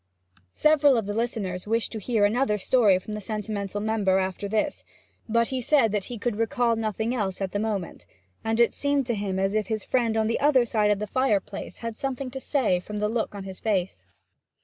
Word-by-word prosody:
Several 290 -4 +4
of 225 - -1
the 205 - -3
listeners 210 -5 -2
wished 225 +1 0
to 220 - -5
hear 215 0 +2
another 215 0 +1
story 210 -2 +4
from 200 +3 -7
the 210 - -4
sentimental 205 -1 -3
member 205 -3 +1
after 190 +1 -2
this, 220 +8 -1 0.5
but 235 +1 +2
he 260 -1 -2
said 245 -4 +3
that 205 -2 -1
he 245 - -6
could 215 0 -2
recall 230 +1 +1
nothing 220 +1 -2
else 200 -6 -2
at 195 -2 -2
the 205 - -1
moment, 205 -5 -3 0.4
and 225 0 0
that 235 - +7
it 235 - 0
seemed 285 -1 +1
to 240 - -1
him 200 -3 -2
as 195 +1 0
if 215 -2 0
his 215 -2 -2
friend 230 -3 +1
on 220 - +2
the 230 - 0
other 275 -4 +4
side 215 -2 +1
of 210 - +3
the 210 - -3
fireplace 210 -4 -1
had 230 -1 -5
something 265 +1 -4
to 265 - -5
say 255 -10 +1
from 210 +4 -7
the 210 0 0
look 225 -2 -2
of 200 - -6
his 190 -1 -8
face. 190 - -1
220 Hz, 220 wpm, -26 LUFS, 200-240 Hz, 0.5 s, that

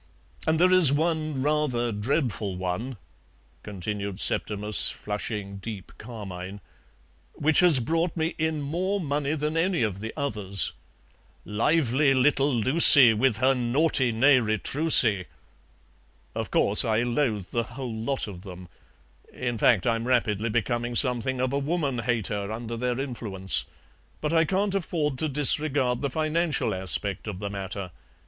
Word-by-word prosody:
And 160 0 +1
there 180 +1 +4
is 180 -7 +5
one 155 -2 -1
rather 140 -6 -1
dreadful 105 - -2
one," 95 +8 -5 0.6
continued 100 0 -6
Septimus, 105 0 +3
flushing 105 -1 -6
deep 100 -1 -9
carmine, 100 -4 -9 0.7
"which 155 +1 +2
has 175 -6 +6
brought 165 +8 -2
me 160 +1 -2
in 155 -2 -2
more 185 +7 -2
money 145 -2 -2
than 150 +1 -3
any 170 -3 0
of 100 -3 -3
the 110 +2 -6
others: 105 - 0 0.7
'Lively 135 +4 +1
little 140 +2 +2
Lucie 130 0 +8
With 115 0 0
her 130 +3 +2
naughty 130 +1 0
nez 130 +3 +3
retroussé.' 110 - +3 1.1
Of - - -5
course, - - +2
I 110 +1 0
loathe 120 -6 -2
the 115 - -1
whole 120 +1 -8
lot 115 +3 -3
of 95 -4 -10
them; 90 -2 -11 0.6
in 120 -3 -5
fact, 105 -5 +2
I'm 115 0 -1
rapidly 115 -3 0
becoming 120 +2 -2
something 125 0 0
of 130 +1 -2
a 140 - 0
woman 140 -3 -2
hater 110 -4 -3
under 115 +1 -6
their 125 +1 -3
influence, 110 -8 -1 0.5
but 150 +1 -3
I 165 -1 +3
can't 195 +4 -1
afford 155 -7 -2
to 155 - -1
disregard 135 -3 +2
the 140 - -2
financial 155 +3 -1
aspect 95 +2 -1
of 105 -4 -5
the 100 +1 -6
matter. 100 -1 -6
125 Hz, 140 wpm, -25 LUFS, 105-150 Hz, 1.1 s, Lucie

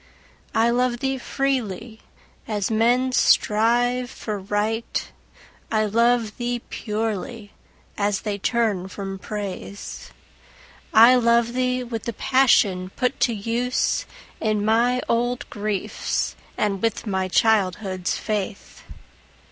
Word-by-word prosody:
I 230 +1 +4
love 245 0 +1
thee 265 +1 -2
freely, 235 -5 -2 0.5
as 210 -1 -1
men 240 +4 +3
strive 245 +2 +3
for 215 -5 -5
Right; 210 +3 -2 0.6
I 215 -1 +2
love 230 +1 +2
thee 240 -1 -2
purely, 215 0 -3 0.5
as 205 -1 +1
they 205 -2 -3
turn 210 -4 0
from 195 0 -6
Praise. 200 -1 -6 0.8
I 230 +3 +8
love 235 -1 +3
thee 255 0 0
with 230 -3 -5
the 235 - -3
passion 205 -8 +3
put 250 -1 -1
to 235 - +2
use 240 - -1 0.3
In 215 -2 0
my 240 +3 +2
old 245 +3 0
griefs, 205 -2 -2 0.2
and 200 -2 0
with 225 0 -1
my 190 -3 -1
childhood's 190 -2 +1
faith. 210 -2 -4
225 Hz, 110 wpm, -23 LUFS, 205-245 Hz, 0.8 s, I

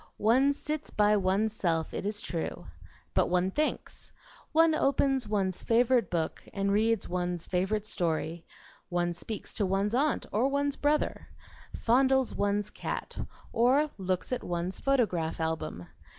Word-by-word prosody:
One 255 +6 +4
sits 300 +1 -4
by 210 0 +3
one's 200 +2 +1
self, 165 -6 -1
it - - -3
is 210 0 -1
true, 165 -2 -4 0.5
but - - +2
one 180 +1 +1
thinks; 305 +8 -3 0.4
one 325 0 +5
opens 270 -4 +2
one's 195 -3 0
favorite 235 -2 +3
book 165 -2 -2
and 200 0 0
reads 220 +1 +2
one's 175 -1 -2
favorite 195 +4 -1
story; 165 -3 -2 0.5
one 175 -1 0
speaks 210 +5 -6
to 210 - 0
one's 195 +3 0
aunt 280 +4 +1
or 225 +6 +2
one's 280 0 0
brother, 295 +1 0 0.5
fondles 265 +2 +3
one's 205 0 0
cat, - - -5 0.4
or 265 +6 +3
looks 185 +2 -2
at 250 - -2
one's 175 +1 -3
photograph 195 -14 +1
album. 160 - -3
210 Hz, 140 wpm, -29 LUFS, 180-260 Hz, 0.5 s, one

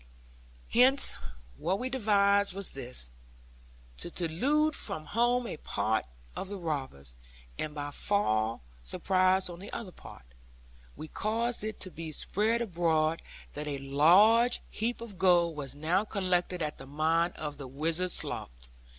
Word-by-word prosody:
Hence, 260 +4 +4 0.4
what 185 - 0
we 250 - -3
devised 200 -5 +3
was 200 -1 -4
this; 120 - -6 0.9
to - - -5
delude 265 - +1
from 155 - -5
home 240 +7 +1
a 195 - -5
part 110 - -1 0.3
of - - -4
the 200 +1 -5
robbers, 135 - -5 0.4
and 155 -1 -3 0.2
fall 115 - +1
by - - -24 0.2
surprise 185 - +2
on 175 -1 -8
the 200 - -9
other 200 -6 -6
part. 60 - -13 0.7
We 155 - -8
caused 230 +5 -1
it 215 0 -4
to 185 - -3
be 165 -1 -6
spread 220 +9 +1
abroad 165 -5 +1 0.3
that 150 +1 -5
a 145 -1 -2
large 185 - +5
heap 230 +2 -2
of 210 -6 -9
gold 175 -3 +4
was 140 -2 -5
now 165 +7 +1
collected 180 -4 0
at 150 0 -4
the 135 - -10
mine 160 +4 +1
of 150 -2 -6
the 135 - -6
Wizard's 165 +7 0
Slough. - - -3
175 Hz, 145 wpm, -30 LUFS, 150-210 Hz, 0.9 s, large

